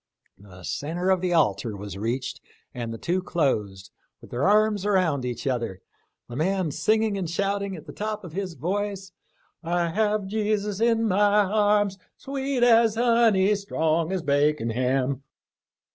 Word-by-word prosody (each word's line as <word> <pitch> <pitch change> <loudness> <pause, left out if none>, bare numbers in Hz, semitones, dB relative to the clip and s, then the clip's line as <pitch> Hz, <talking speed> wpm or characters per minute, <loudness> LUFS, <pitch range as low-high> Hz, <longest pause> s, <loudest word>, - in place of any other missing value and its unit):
The 95 -2 -14
centre 175 - -2
of 185 -2 +2
the 180 -1 0
altar 130 -10 +1
was 100 -1 -7
reached, 115 +6 -3 0.3
and 120 -2 -5
the 115 - -5
two 180 +9 -1
closed, 105 - -1 0.3
with - - -15
their 125 +8 0
arms 210 -1 +3
around 180 -10 +1
each 120 +2 -4
other, 115 -8 -2 0.5
the 120 - -8
man 180 +2 0
singing 215 +4 +1
and 175 -4 -3
shouting 200 +2 -1
at 160 -2 -11
the 145 - -10
top 215 0 -4
of 175 -4 -9
his 185 -2 -4
voice, 195 +5 -3 0.2
" - - -39
' - - -48
I 170 0 0
have 210 +3 +1
my 190 - -8
Jesus 210 -1 -1
in 230 -1 +3
my 205 +1 +4
arms 205 -1 +2 0.2
Sweet 270 -2 -2
as 230 -2 +5
honey, 230 -4 +4
strong 165 -4 0
as 185 -3 -2
bacon 145 -4 +1
ham.' 130 +2 0
185 Hz, 165 wpm, -25 LUFS, 140-210 Hz, 0.5 s, as